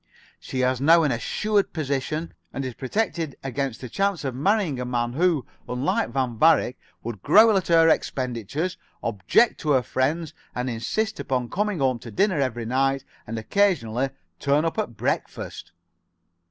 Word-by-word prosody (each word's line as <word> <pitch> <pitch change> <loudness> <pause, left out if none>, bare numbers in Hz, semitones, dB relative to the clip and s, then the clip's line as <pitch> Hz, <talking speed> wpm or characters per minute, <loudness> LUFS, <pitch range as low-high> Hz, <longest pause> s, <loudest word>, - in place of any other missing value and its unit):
She 130 - -3
has 130 0 +1
now 165 +3 +6
an 145 - +2
assured 205 - 0
position, 155 +1 -2 0.2
and 135 - -4
is 130 - -4
protected 165 - -2
against 135 -2 -3
the 125 - -5
chance 195 - -1
of 135 -2 -2
marrying 160 - +1
a - - -2
man 120 -1 -1
who, 165 -2 +2 0.2
unlike 125 -2 0
Van 120 -3 -2
Varick, 155 -5 +4 0.2
would 115 -4 -6
growl 220 - +6
at 190 - 0
her 165 -1 +5
expenditures, 135 - -1 0.3
object 115 - +2
to 150 -2 +1
her 130 -2 +3
friends, 150 +6 -1 0.2
and 125 +1 -2
insist 215 - -2
upon 125 -2 -2
coming 210 -1 0
home 130 -4 +1
to 115 - -9
dinner 185 - +1
every 120 -4 -1
night, 135 +3 +1 0.2
and 115 +1 -4
occasionally 130 - +1 0.3
turn 145 +3 +2
up 165 - -1
at 115 - -3
breakfast." - - -3
135 Hz, 160 wpm, -24 LUFS, 125-170 Hz, 0.3 s, now